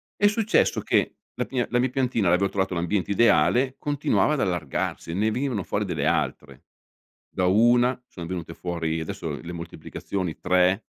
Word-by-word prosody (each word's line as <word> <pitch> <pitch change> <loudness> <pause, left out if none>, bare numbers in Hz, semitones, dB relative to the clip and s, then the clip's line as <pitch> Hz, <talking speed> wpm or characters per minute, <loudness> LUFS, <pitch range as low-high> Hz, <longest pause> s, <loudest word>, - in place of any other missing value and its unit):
È 205 - +4
successo 215 +1 +2
che - - +1 0.2
la - - -2
mia 125 -2 0
la 120 - +1
mia 130 +1 +1
piantina 125 -6 0
aveva 90 +3 +3
trovato 95 -1 -1
l'ambiente 90 +4 -1
ideale, 115 - +3
continuava 145 +1 +1
ad 150 - 0
allargarsi, 85 -1 -2
ne 105 +5 +1
venivano 125 -4 -2
fuori - - -2
delle - - -2
altre. - - -2 0.7
Da 90 - -1
una 120 +6 +4
sono 85 -2 -8
venute 85 -2 -5
fuori, 85 -2 -2
adesso, 80 - -5
le 85 - -8
moltiplicazioni: 85 +1 -5
3 90 +3 +2
95 Hz, 160 wpm, -25 LUFS, 85-125 Hz, 0.7 s, È